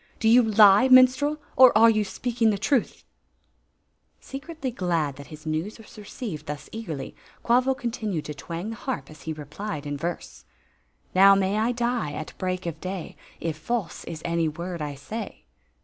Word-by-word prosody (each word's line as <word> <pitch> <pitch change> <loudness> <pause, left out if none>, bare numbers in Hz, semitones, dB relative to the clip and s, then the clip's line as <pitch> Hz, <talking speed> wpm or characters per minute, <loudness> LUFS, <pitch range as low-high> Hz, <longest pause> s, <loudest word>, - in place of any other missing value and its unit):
" - - -32
Do 220 - +1
you 240 +3 +7
lie, 210 0 +6
minstrel, 255 +3 +5 0.2
or 255 -4 +7
are 225 +1 +7
you 215 -1 +1
speaking 230 +2 0
the 205 - +1
truth? 235 +4 0 0.6
" - - -46 0.3
Secretly 275 0 -6
glad 170 - -1
that 140 - -10
his 155 0 -12
news 160 +7 -3
was 225 - -15
received 205 - -7
thus 150 0 -6
eag 225 0 -6
erI3^ 140 -4 -5 0.3
Quavo 255 +2 +3
continued 215 -9 -3
to 150 - -5
twang 170 +8 -6
the - - -6
harp 260 -7 -5
as 155 - -14
he 160 - -4
re 150 -1 -9
plied 155 0 -6
in 145 0 -3
verse: 170 +4 -5 0.3
" - - -41 0.3
Now 195 +1 +7
may 195 +2 +1
I 225 +3 +1
die 240 -9 -1
at 155 - -6
break 185 -1 -2
of 165 -2 -5
day. 185 -2 -5 0.2
If 165 -2 -3
false 205 +3 -3
is 165 -2 -7
any 170 -1 +1
word 170 +2 -5
I 145 -1 -4
say." 215 +12 -7
195 Hz, 190 wpm, -25 LUFS, 160-235 Hz, 0.6 s, you